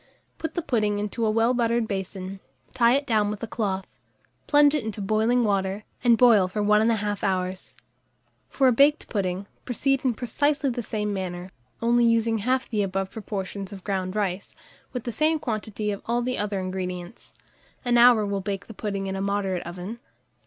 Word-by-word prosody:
Put 320 - -4
the 345 - -1
pudding 210 -8 +1
into 210 +3 -3
a 220 - +3
well 225 +3 +3
buttered 235 -1 +1
basin, 190 -1 -5 0.3
tie 235 -1 +4
it 280 +1 0
down 215 -5 +2
with 210 0 -5
a - - -2
cloth, 195 -4 -2 0.6
plunge 290 -1 +5
it 300 -5 0
into 220 -1 -5
boiling 220 +5 +2
water, 200 -1 0 0.2
and 235 -2 +5
boil 220 -7 +6
for 210 +3 -2
1 210 +1 +4
1/2 210 -3 -1
hour. 185 -2 0 1.0
For 270 - +2
a - - +6
baked 285 +5 +3
pudding, 195 -2 -2 0.2
proceed 270 +2 0
in 250 -4 +1
precisely 280 +4 0
the 240 0 -3
same 210 -2 -2
manner, 185 -1 -5 0.3
only 240 +1 +4
using 230 -1 +2
half 255 +5 0
the 215 -3 -1
above 195 -1 -2
proportion 200 -2 -5
of 195 -2 -9
ground 190 -1 -2
rice, 200 -2 -2 0.4
with 250 -3 -4
the 240 - -3
same 310 +7 +2
quantity 215 -5 -3
of 200 - -5
all 240 +1 +1
the 250 +1 -1
other 205 -1 -1
ingredients: 185 +1 -6 0.5
an 240 -1 +4
hour 235 -3 +7
will 200 -1 -2
bake 195 0 -4
the 225 - -10
pudding 200 -2 -3
in 190 0 -3
a 195 - -3
moderate 195 -2 -1
oven. 180 +6 -7
210 Hz, 185 wpm, -25 LUFS, 195-240 Hz, 1.0 s, hour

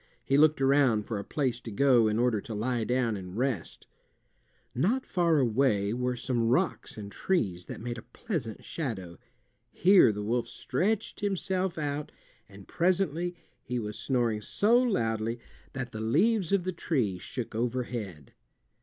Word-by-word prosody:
He 135 - +1
looked 155 +1 +5
around 135 -6 +3
for 110 -3 -3
a - - -5
place 125 -1 -1
to - - -7
go 120 0 +4
in 105 0 0
order 120 -3 +2
to 110 - -7
lie 120 +2 -1
down 125 -2 +1
and 95 0 -7
rest. 125 -8 -2 0.9
Not 215 - +1
far 170 -3 +2
away 115 -5 +2
were 125 +1 -1
some 120 -1 0
rocks 145 +4 0
and 100 -1 -7
trees 95 - -1
that - - -7
made 120 0 -4
a - - -17
pleasant 150 - -4
shadow. 95 - -5 0.5
Here 185 - +6
the 105 0 -4
wolf 120 +3 0
stretched 200 - -1
himself 190 -2 -1
out, 145 -1 -3 0.4
and 100 -1 -14
presently 175 -1 0 0.3
he 125 - -4
was 105 -3 -4
snoring 120 -5 0
so 210 - +2
loudly 115 - 0 0.4
that 125 -2 -4
the 110 - -6
leaves 180 - +2
of 200 -3 +3
the 185 +1 -2
trees 115 - -1
shook 125 -3 -5
overhead. 115 - -3
125 Hz, 155 wpm, -29 LUFS, 110-160 Hz, 0.9 s, Here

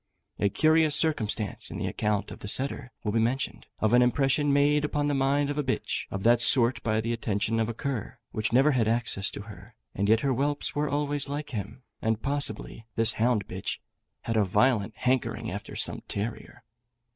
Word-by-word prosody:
A 100 - +2
curious 155 +4 +3
circumstance, 110 - 0
in - - -6
the - - -3
account 105 -1 -1
of - - -9
the - - -8
setter, 130 +2 -1
will 105 - -1
be 115 - +1
mentioned, 120 +4 -1
of 110 +1 +1
an 125 - +6
impression 135 +3 +2
made 145 +1 +3
upon 150 -1 0
the 145 - +1
mind 140 +1 +1
of 145 - -3
a - - +1
bitch 130 - -2
of 95 0 -5
that 120 +2 +4
sort 125 -1 +4
by 110 -1 0
the 115 +1 -2
attention 115 0 -1
of 110 0 0
a - - -3
cur, 135 -4 -4
which 110 - -2
never 135 +5 +5
had 120 -5 +1
access 115 -4 0
to - - -7
her, 105 0 -13 0.2
and 100 +1 -1
yet 110 +1 +4
her 140 - +1
whelps 145 +3 -1
were 145 0 -1
always 145 0 -1
like 145 +1 -4
him, 115 +3 -6 0.2
and 110 0 -1
possibly 140 -5 -1
this 115 -1 +3
hound 110 -3 +1
bitch 95 +1 -4 0.4
had 115 - -3
a 105 - +4
violent 105 +2 +2
hankering 130 0 -1
after - - -7
some - - 0
terrier. 115 +3 -5
120 Hz, 200 wpm, -27 LUFS, 110-140 Hz, 0.4 s, an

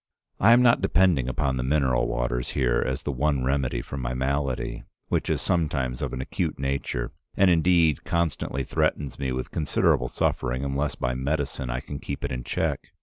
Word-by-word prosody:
"I 115 +4 +7
am 125 +1 +6
not 120 -1 +5
depending 85 -10 +3
upon 65 -1 0
the 60 - -1
mineral 65 -2 +2
waters - - -2
here 60 -3 +2
as 65 +3 -3
the 70 - -1
one 70 0 0
remedy 65 -2 0
for 70 - -7
my 60 -1 -3
malady, 65 -1 -1 0.3
which - - 0
is - - 0
sometimes 70 -8 0
of - - -2
an 65 - -4
acute - - -2
nature, 70 -3 -2 0.3
and 95 -2 +5
indeed 85 -2 +3
constantly 85 -5 -1
threatens 70 +1 -1
me 65 -2 -1
with 65 0 -4
considerable 70 -4 +2
suffering 65 +2 -1
unless 70 +1 -1
by 60 0 -1
medicine 70 -1 -2
I - - -2
can 70 - -7
keep 70 0 -5
it 70 - -3
in 60 -1 -3
check. 65 - -2
70 Hz, 185 wpm, -26 LUFS, 65-75 Hz, 0.3 s, I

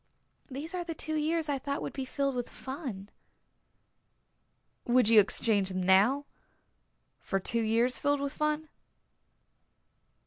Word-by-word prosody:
These 290 +6 -6
are 360 -1 -2
the 335 -1 -5
two 315 +1 -3
years 310 +1 0
I 280 -2 -1
thought 280 +2 -3
would - - -5
be 270 - -4
filled 275 +1 -1
with 245 -1 -3
fun." 260 - -7 1.8
"Would 245 -2 +4
you 225 -2 +8
exchange 205 -1 +2
them 185 -1 -2
now 205 +10 +4 0.9
for 195 - -2
two 230 +5 0
years 230 +3 +1
filled 285 0 +1
with 280 0 -3
fun?" 305 +1 -1
265 Hz, 135 wpm, -30 LUFS, 220-300 Hz, 1.8 s, you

